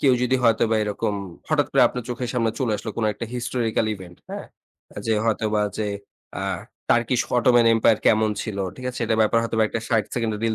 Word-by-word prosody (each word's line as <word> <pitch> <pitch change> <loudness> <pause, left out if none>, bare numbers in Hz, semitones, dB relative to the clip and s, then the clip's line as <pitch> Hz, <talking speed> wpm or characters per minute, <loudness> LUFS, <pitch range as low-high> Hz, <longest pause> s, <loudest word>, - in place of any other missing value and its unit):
কেউ 135 - +5
যদি 125 +1 +2
হয়তোবা 115 -1 +3
এরকম 105 0 -1 0.3
হঠাৎ - - +2
করে - - +5
আপনার 125 - -5
চোখের 125 0 -3
সামনে 115 -2 +1
চলে 125 -5 0
আসলো 105 +2 -5
কোনো 110 -2 +1
একটা 115 - -6
historical 120 -2 -1
event, 90 -3 -12
হ্যাঁ? - - -6 0.4
অ্যা - - -9
যে 110 - +2
হয়তোবা 110 -1 +1 0.2
যে 110 - 0 0.5
আ - - -3 0.5
Turkish 120 +1 +3
Ottoman 120 -1 +5
Empire 110 -1 +3
কেমন 110 0 +4
ছিল, 105 -3 -5 0.2
ঠিক 130 - -6
আছে? 125 - -8
এটার 110 -1 0
ব্যাপারে 115 +2 +3
হয়তোবা 115 -1 +1 0.2
৬০ 115 -4 +2
সেকেন্ডের 110 -3 -1
রিল 115 -1 +1
115 Hz, 195 wpm, -23 LUFS, 110-120 Hz, 0.5 s, কেউ